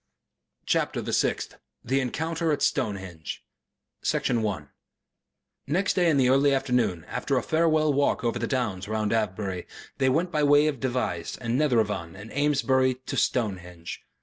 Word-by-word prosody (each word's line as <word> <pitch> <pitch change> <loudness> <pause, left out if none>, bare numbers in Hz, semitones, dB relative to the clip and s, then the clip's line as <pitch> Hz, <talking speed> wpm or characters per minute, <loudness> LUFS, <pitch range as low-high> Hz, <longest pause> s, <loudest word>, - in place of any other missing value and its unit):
CHAPTER - - 0
THE - - -4
SIXTH - - 0 0.3
THE 135 +3 +1
ENCOUNTER 160 +5 -1
AT 145 - 0
STONEHENGE 95 - -2 0.6
Section 120 -3 +1
1 90 -10 -3 1.0
Next 180 +8 +1
day 175 -2 +3
in 150 - +3
the 130 -2 +4
early 135 +2 +4
afternoon 125 - 0
after - - -1
a - - 0
farewell 155 -2 +2
walk 140 -1 +1
over 120 - 0
the - - -1
downs 105 -9 -2
round 110 0 -1
Avebury 95 -4 -2 0.3
they 130 -1 +3
went 165 +7 +1
by 155 -3 +1
way 145 +1 +5
of 150 -4 -1
Devizes 120 -10 -2
and 120 -1 -2
Netheravon 105 - +1
and 105 +4 -10
Amesbury 135 -2 +2
to 130 +1 -7
Stonehenge. 90 -7 -2
125 Hz, 150 wpm, -26 LUFS, 105-145 Hz, 1.0 s, way